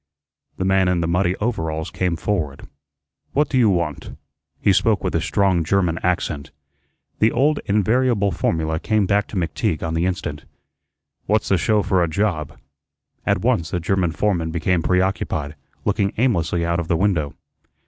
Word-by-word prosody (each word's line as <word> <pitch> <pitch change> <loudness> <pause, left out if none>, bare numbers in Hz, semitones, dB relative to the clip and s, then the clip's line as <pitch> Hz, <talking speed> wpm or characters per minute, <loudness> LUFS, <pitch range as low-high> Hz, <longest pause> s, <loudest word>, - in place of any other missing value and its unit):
The 95 - -1
man 95 -1 +3
in 90 -1 +1
the 85 - 0
muddy 90 +1 +1
overalls 80 -8 -2
came 90 -2 -1
forward. 80 -6 -3 0.7
"What 145 0 +1
you 125 -4 +4
want?" 85 -6 -2 0.4
He - - +3
spoke - - +2
with - - -1
a - - +1
strong 95 -4 +2
German 85 -1 +1
accent. 80 -5 -1 0.7
The 110 +1 +4
old 145 +5 +2
invariable 105 0 +2
formula 80 -2 -1
came 110 +1 +1
back 100 +1 +1
to - - -9
McTeague 85 -3 -1
on 80 -1 -2
the 85 +2 +1
instant. 80 -5 -4 0.8
"What's 105 0 +1
the 95 - +4
show 105 +3 +2
for 95 -2 +2
a 85 - +2
job?" 80 -5 -1 0.7
At - - +2
once 80 -2 +1
the 90 - -1
German 90 0 0
foreman 85 -2 0
became 85 +2 0
preoccupied, 90 -4 0 0.3
looking 100 -1 +1
aimlessly 85 -8 +1
out 85 0 0
of 85 - -3
the 85 -2 +1
window. 85 -6 0
90 Hz, 160 wpm, -21 LUFS, 80-100 Hz, 0.8 s, you